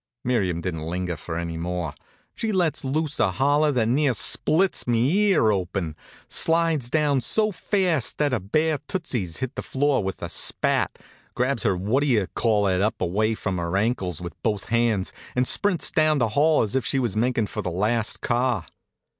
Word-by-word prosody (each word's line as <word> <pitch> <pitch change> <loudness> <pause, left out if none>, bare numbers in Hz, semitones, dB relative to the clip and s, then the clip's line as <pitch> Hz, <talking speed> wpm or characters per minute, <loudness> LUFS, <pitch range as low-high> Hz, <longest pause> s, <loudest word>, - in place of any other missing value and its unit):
Miriam 95 -9 0
didn't 80 -3 -4
linger 90 0 -3
for 80 +2 -6
any 85 -1 -4
more. 85 -2 -3 0.4
She 225 - -2
lets 175 -7 0
loose 150 +2 -2
a - - +3
holler 145 +9 +2
that 120 -5 +1
near 135 +1 +2
splits 175 - +2
me 120 +3 +2 0.2
ear 135 - +4
open, 90 -4 -2 0.3
slides 165 -6 +2
down 145 -2 +2
so 215 - +2
fast 180 - 0
that 150 -1 +1
her 125 - 0
bare 155 - 0
tootsies 120 - -3
hit 130 -1 -4
the - - -5
floor 140 -3 0
with 95 0 -5
a - - -2
spat, - - +1 0.4
grabs 125 -1 0
her 95 - +1
what 105 +9 0
d'ye 120 -9 +2
call 105 -3 +1
it 95 -1 +1
up 105 +2 0
away 110 +5 0
from 95 -4 -3
her 85 +2 -1
ankles 100 -6 -1
with 85 -1 -6
both 105 -4 -2
hands, 115 -4 +1 0.2
and 125 0 +1
sprints 200 -5 +1
down 155 -1 +3
the 120 -4 +1
hall 150 +6 +3
as 110 +3 -3
if 135 - +1
she 135 - -1
was 120 -7 -1
makin' 120 0 +1
for - - -5
the - - -3
last 105 +5 -1
car. 120 -6 0
120 Hz, 185 wpm, -24 LUFS, 95-145 Hz, 0.4 s, ear